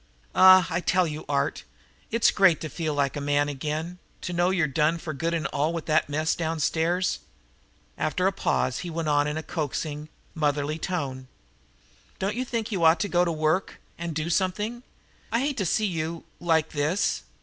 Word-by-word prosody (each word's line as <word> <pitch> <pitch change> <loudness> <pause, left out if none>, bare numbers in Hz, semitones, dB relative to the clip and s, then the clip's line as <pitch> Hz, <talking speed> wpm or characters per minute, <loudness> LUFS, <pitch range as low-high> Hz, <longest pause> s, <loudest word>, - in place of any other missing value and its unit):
"Ah, 185 -1 +8
I 165 - +1
tell 180 0 +2
you, 155 -1 -5
Art, 140 0 0 0.5
it's 230 0 +3
great 190 -5 +4
to 155 - -4
feel 155 -3 -3
like 140 -2 0
a 145 - -3
man 145 0 +1
again, 155 +5 -4 0.2
to 180 - -4
know 175 +1 +2
you're 185 -4 +2
done 150 +3 +1
for 160 -1 -5
good 165 +4 -2
and 160 -3 -2
all 155 +4 +1
with 165 -2 -4
that 155 -2 +2
mess 155 +2 +1
downstairs." 165 +2 0 0.8
After 180 +4 0
a 190 - +4
pause 160 -8 0
he 180 - -5
went 165 -1 -2
on 145 0 +3
in 150 +1 -2
a 160 - -4
coaxing, 150 -1 -4 0.2
motherly 150 0 0
tone. 135 -8 -3 0.9
"Don't 195 +2 -1
you 250 - -2
think 230 -2 -3
you 185 -5 -1
ought 160 +1 +6
to 205 - 0
go 175 0 +3
to 175 - 0
work 155 +3 0 0.2
and 170 -2 -5
do 160 +2 -2
something? 210 +7 -1 0.5
I 230 - +2
hate 280 0 -1
to 195 -5 0
see 215 - +1
you 165 -3 -3 0.2
like 160 -2 +2
this. 155 +6 0
165 Hz, 190 wpm, -26 LUFS, 150-180 Hz, 0.9 s, Ah